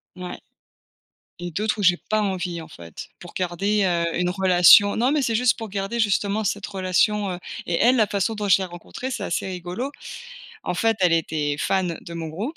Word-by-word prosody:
Ouais 180 -1 -7 1.0
et 175 0 -5
d'autres 215 +5 -1
où - - -2
j'ai 180 -1 +5
pas 215 - +2
envie 180 -4 -2
en 160 - -9
fait 85 -2 -10
pour - - -11
garder, 195 +3 0
heu, 170 -2 0
une 180 0 +1
relation. 190 +2 +6
Non 250 +5 +2
mais 300 - +1
c'est 230 -3 +1
juste 250 0 +2
pour 225 -2 -6
garder 195 +4 -3
justement 205 0 +1
cette 205 0 -2
relation, 195 +1 0
heu, 180 - -4 0.3
et 170 - -2
elle, 245 +2 +5
la 220 -5 +3
façon 200 +2 -1
dont 210 -1 -3
je 185 - +6
l'ai 190 - -2
rencontrée, 185 +9 -7
c'est 225 - -4
assez 185 - -2
rigolo. 185 +8 -5 0.7
En - - -2
fait, 225 +5 +1
elle 180 -2 +4
était 150 -3 0
fan 180 0 0
de 170 - -10
mon 165 -1 -5
groupe 210 - -5
190 Hz, 205 wpm, -23 LUFS, 175-215 Hz, 1.0 s, relation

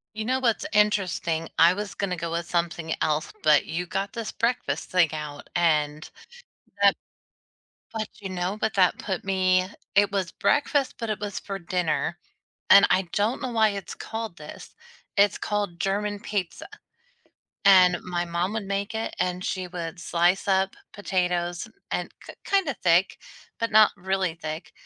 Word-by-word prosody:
You 215 0 -3
know 260 +3 +1
what's 235 -4 +1
interesting? 185 -6 +1
I 170 +2 +7
was 205 +1 -5
gonna 195 -3 -2
go 165 0 -4
with 170 0 -2
something 170 -2 -1
else, 155 0 0
but 150 -2 +5
you 175 +2 -3
got 195 +3 -3
this 230 -2 -4
breakfast 230 - -1
thing 175 -4 +3
out 150 -2 -7
and 155 -3 +1 0.7
that - - +6 1.0
but, 215 -2 -3
you 195 - -5
know, 185 +2 -2
but 220 - 0
that 185 -2 +3
put 190 -3 -3
me 185 -1 +2 0.3
it 200 0 +4
was 190 -4 -1
breakfast, 285 -1 +1
but 230 -2 -3
it 215 -1 -2
was 205 -1 -4
for 195 -1 -6
dinner. 175 -1 -1 0.5
And 200 - +9
I 190 - +3
don't 215 +7 0
know 255 -2 -3
why 220 -2 +4
it's 200 -1 -6
called 225 -5 -6
this. 150 0 -11 0.4
It's 200 0 +4
called 205 -5 -2
German 205 +2 -1
pizza. 200 -4 -4 1.0
And 185 -2 +7
my 175 -1 -2
mom 175 +3 -1
would 220 -1 -2
make 200 +2 -3
it, 225 - -3
and 180 0 -1
she 185 -1 -3
would 175 -1 -6
slice 175 +3 +1
up 190 0 +2 0.2
potatoes 180 -3 -1 0.2
and - - -2 0.2
k - - -9
kinda 375 -9 +1
thick, 175 +2 +3 0.4
but 230 - -1
not 215 0 +7
really 190 -2 -1
thick. 155 0 -6
185 Hz, 160 wpm, -25 LUFS, 170-205 Hz, 1.0 s, And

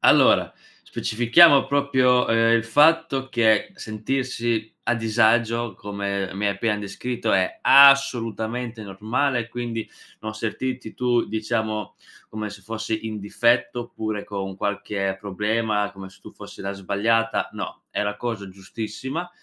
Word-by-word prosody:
Allora, - - +4 0.3
specifichiamo 130 +7 +4
proprio, 130 -3 +2
ehm, 115 0 +3
il 115 - -1
fatto 145 +1 +3
che 110 -4 +2
sentirsi 115 0 -3
a 120 - +1
disagio, 115 0 +1
come 100 -1 -4
mi 100 +1 -1
hai 100 - +2
appena 105 +1 -1
descritto, 110 +4 -3
è 95 -1 +1
assolutamente 125 -4 +4
normale, 115 +5 -1
quindi 120 -2 -5 0.3
non 110 0 -6
sentirti 115 +2 -4
tu, 125 -1 +1
diciamo, 110 -1 -3 0.3
come 110 0 -5
se 100 0 -11
fossi 110 +1 -4
in 110 -1 -5
difetto 120 +4 +1
oppure 110 -3 -5
con 95 -2 -5
qualche 100 -1 -2
problema, 105 +1 -1
come 95 -1 -10
se 95 - -20
tu - - -12
fossi - - -12
la 100 0 -3
sbagliata. 105 +4 0
No, - - -7
è - - -1
la 105 0 -3
cosa 105 -4 -5
giustissima, 115 - -6
110 Hz, 135 wpm, -23 LUFS, 105-120 Hz, 0.3 s, Allora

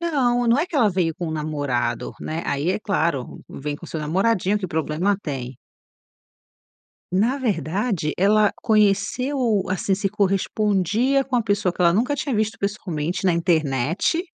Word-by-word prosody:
Não, 250 -8 +1
não 235 +3 +4
é 315 - +1
que 345 - -4
ela 235 -6 +4
veio 175 -3 0
com 170 +2 -5
o - - -3
namorado, 150 -5 -2
né. 160 +2 -4
Aí, 145 +4 0
é 190 - 0
claro, 170 - -1
vem 145 +1 -5
com 170 - -12
o - - -12
seu 160 - -4
namoradinho 190 +5 +1
que 195 - -4
problema 160 +4 0
tem. 130 -4 -5 1.6
Na 225 +9 +2
verdade, 190 - -1
ela 210 +2 +4
conheceu, 215 +2 +2
assim, 190 +1 0
se 195 +1 -1
correspondia 210 +5 +1
com 260 -1 -1
a 240 - +2
pessoa 205 -4 0
que - - -11
ela 170 -1 +5
nunca 245 +10 +1
tinha 275 -3 -2
visto 215 0 -1
pessoalmente 180 -5 -3
na 185 - +4
internet. 165 - +1
195 Hz, 165 wpm, -22 LUFS, 160-225 Hz, 1.6 s, ela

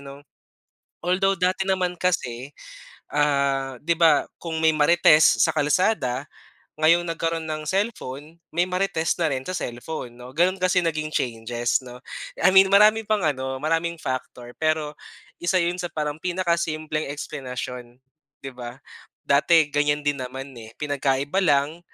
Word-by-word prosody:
'no. 140 0 -10 0.8
Although 195 +2 +2
dati 185 +1 +1
naman 185 -2 0
kasi, 135 -7 -1 0.6
ah 140 -2 +1
'di 170 +2 +1
ba 160 -3 +4
kung 165 -2 -4
may 160 - +6
marites 155 0 +5
sa - - +3
kalsada, 145 - +1 0.5
ngayong 170 +2 +4
nagkaroon 165 -1 -2
ng 155 0 -3
cellphone, 165 - -3 0.2
may 175 +1 +3
marites 180 -3 0
na 165 - +2
rin 130 -1 -2
sa 185 - -3
cellphone 120 0 -6
'no. 125 +1 -11
Gano'n 175 +6 +2
kasi 185 0 +3
naging 155 -2 -2
changes 120 +1 -1
'no. 125 0 -11 0.4
I - - +5
mean 190 0 +8
marami 215 +2 +6
pang 215 -1 +2
ano, 130 -2 -2
maraming 165 +2 0
factor. 125 -2 -5
Pero 155 -1 0 0.5
isa 175 +2 +1
'yon 175 +1 0
sa 175 - -2
parang 150 -1 -3
pinaka-simpleng 170 -4 -1
eksplenasyon, 125 -4 -7 0.4
'di 135 - -6
ba. 120 0 -8 0.5
Dati 150 +2 +4
ganiyan 145 0 +1
din 145 -1 0
naman 130 +2 -6
eh. 110 -1 -11
Pinagkaiba 145 +2 -1
lang, 150 -1 +1
155 Hz, 140 wpm, -24 LUFS, 135-175 Hz, 0.8 s, mean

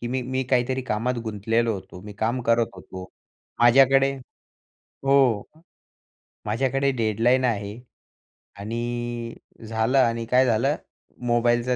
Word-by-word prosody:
की 120 - -4
मी 130 +1 -2
मी 130 +1 -2
काहीतरी 130 +1 +1
कामात 125 +2 -1
गुंतलेलो 115 +2 0
होतो. 95 -2 -10
मी 105 0 -9
काम 110 +5 -1
करत 115 0 +3
होतो. 95 0 -9 0.6
माझ्याकडे 135 +3 +5 0.9
हो. 135 -6 +3 1.0
माझ्याकडे 135 +5 0
डेडलाईन 120 +2 +1
आहे 105 -2 -2 0.8
आणि 120 +2 -4 0.3
झालं 110 +4 0
आणि 115 -2 +1
काय 125 +3 +3
झालं 125 +5 +1 0.5
मोबाईलचा 120 +1 +2
120 Hz, 110 wpm, -24 LUFS, 110-130 Hz, 1.0 s, माझ्याकडे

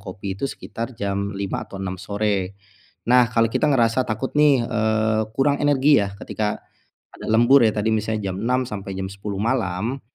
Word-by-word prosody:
kopi 95 -1 -6
itu 120 - -4
sekitar 115 +1 -7
jam 100 0 -2
5 100 -1 -3
atau 100 - -9
6 95 -1 -4
sore. 100 -2 -2 0.5
Nah 125 -1 +5
kalau 115 0 +3
kita - - +1
ngerasa 125 -2 +2
takut 110 +4 -3
nih, 145 -5 +4
eee, 110 0 +1
kurang 140 +1 +2
energi 145 -1 +4
ya, 100 - -4
ketika 105 -1 -3 0.6
ada - - -9
lembur 120 +5 +6
ya, 110 - +2
tadi 105 +1 0
misalnya 110 -2 -2
jam - - -6
6.00 125 +2 +1
sampai 100 -3 -6
jam 95 - -3
10.00 100 +1 -6
malam, 115 +1 -1
110 Hz, 175 wpm, -22 LUFS, 100-125 Hz, 0.6 s, lembur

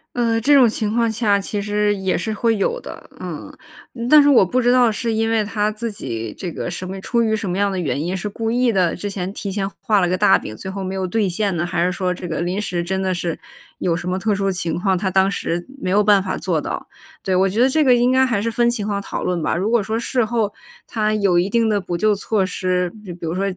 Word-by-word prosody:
嗯， 230 -2 +1
这 285 +5 +5
种 255 -4 +7
情 215 -1 -1
况 230 -1 +2
下 210 -3 +2
其 200 +1 -3
实 210 0 +1
也 190 -1 -1
是 220 +4 -3
会 225 +1 +1
有 475 - 0
的， - - -10
嗯。 - - -7 0.6
但 305 - +9
是 290 - +4
我 240 -8 +6
不 255 +8 0
知 245 - +3
道 245 -2 +4
是 230 +2 -2
因 225 +1 +1
为 225 -1 +2
他 210 0 -1
自 225 +1 -4
己 115 - -5
这 180 - -5
个 - - -4
什 185 +1 -5
么 190 +1 -6
出 235 +4 0
于 220 -1 +1
什 200 -3 -3
么 180 - -2
样 200 0 +1
的 190 - -3
原 150 -4 -1
因 175 +4 -2
是 185 - -4
故 225 +2 -3
意 245 0 +2
的， 185 -5 +1
之 205 - -4
前 190 -1 -4
提 200 -1 -5
前 195 0 -2
画 210 -2 +2
了 180 - +2
个 180 - +1
大 - - +5
饼， 110 - -8
最 190 - -7
后 195 0 -5
没 190 0 -4
有 190 -1 -2
兑 210 +2 0
现 195 +1 -1
呢， 170 - 0
还 175 -1 0
是 180 - +1
说 180 -1 -1
这 180 0 -7
个 160 -2 -3
临 180 +4 -1
时 175 -4 -2
真 190 +2 -2
的 190 -1 0
是 175 -2 -3 0.4
有 170 -2 0
什 175 +1 -5
么 185 +1 -1
特 215 +2 0
殊 195 0 0
情 170 -3 -2
况， 190 0 +1
他 190 +1 -1
当 190 +1 +3
时 175 -1 -3 0.2
没 - - -2
有 205 +3 +3
办 205 -1 +5
法 185 - -3
做 165 -5 -1
到。 - - -5 0.4
对， 190 -1 0
我 190 +1 +3
觉 210 - -2
得 260 - +6
这 310 +3 +3
个 255 -3 +5
应 245 +1 +3
该 260 0 +4
还 235 -5 0
是 230 +3 -1
分 235 +1 +2
情 230 -4 -2
况 200 -1 -1
讨 - - -5
论 175 -2 -1
吧， - - 0
如 190 +5 0
果 235 -2 +3
说 220 +3 -2
事 245 0 0
后 215 -2 -1 0.3
他 215 -1 0
有 195 -4 +3
一 185 +3 0
定 230 +1 +2
的， 205 -2 +1
补 175 -1 -3
救 215 +3 +3
措 205 0 0
施， 180 -1 -1
比 185 - -8
比 170 -1 -8
如 160 - -2
说 190 +2 -1
200 Hz, 300 characters per minute, -20 LUFS, 185-225 Hz, 0.6 s, 但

